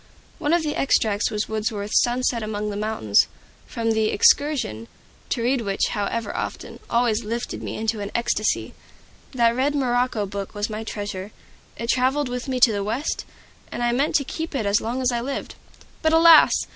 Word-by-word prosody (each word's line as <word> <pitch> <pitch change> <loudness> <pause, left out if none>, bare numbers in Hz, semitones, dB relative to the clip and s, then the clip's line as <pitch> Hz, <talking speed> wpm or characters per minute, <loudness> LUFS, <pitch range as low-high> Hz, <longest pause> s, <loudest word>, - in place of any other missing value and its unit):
One 295 - 0
of 340 -1 +3
the 300 -1 -2
extracts 215 -6 +1
was 210 -1 -2
Wordsworth's 215 -1 0
"Sunset 245 -1 0
among 210 -1 -3
the - - -5
Mountains," 205 - +2 0.4
from 225 -1 -1
the 220 -1 +1
"Excursion," 225 - +2 0.4
to 235 - -1
read 250 +1 +1
which, 200 -3 0
however 210 +2 -2
often, - - -5
always 235 -1 +1
lifted 230 +3 -4
me - - -5
into 220 0 -1
an 200 0 -4
ecstasy. 215 -2 0 0.6
That 235 -2 +3
red 280 +3 +1
morocco 245 -5 0
book 200 0 -6
was 205 +1 -2
my 215 +1 -4
treasure. 205 -2 -5 0.5
It 230 - -4
traveled 260 +2 +1
with 250 +1 -4
me 260 -1 -1
to 240 - +7
the 200 -1 -2
West, 230 +9 -2 0.5
and 240 - -3
I 240 - +2
meant 275 +5 0
to 280 - +3
keep 320 +2 -5
it 230 -6 -1
as 200 +1 +2
long 245 +4 -3
as 250 - +2
I 240 -1 -1
lived. 275 +3 -4 0.5
But 315 -1 +2
alas! 325 -1 +7
230 Hz, 185 wpm, -23 LUFS, 210-255 Hz, 0.6 s, to